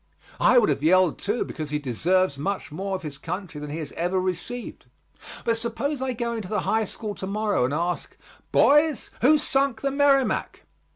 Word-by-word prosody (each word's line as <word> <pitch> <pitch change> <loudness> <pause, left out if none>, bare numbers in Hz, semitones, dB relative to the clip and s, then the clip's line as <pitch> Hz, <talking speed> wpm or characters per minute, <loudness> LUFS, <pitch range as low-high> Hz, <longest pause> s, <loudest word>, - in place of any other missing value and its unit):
I 250 - +5
would 225 -7 +5
have 140 -1 0
yelled 180 +1 +4
too, 210 +4 -1
because 155 -2 -6
he 150 - 0
deserves 155 +6 +1
much 195 +4 -3
more 195 +5 -3
of 185 - -6
his 145 -2 -7
country 170 -1 -5
than 150 - -6
he 150 - -4
has 155 -3 -5
ever 180 +3 -1
received. 185 +7 -4 0.6
But 230 -1 +1
suppose 255 +5 -2
I 260 -1 -1
go 235 0 -2
into 220 -5 -4
the 210 - 0
High 220 0 +1
School 210 +1 -6
to 190 - -6
morrow 205 -8 +1
and 130 - -1
ask, 175 +2 -3 0.3
"Boys, 295 0 +4
who 300 +5 +6
sunk 275 -5 0
the 275 - 0
Merrimac?" 275 -2 +2
200 Hz, 190 wpm, -25 LUFS, 165-245 Hz, 0.6 s, who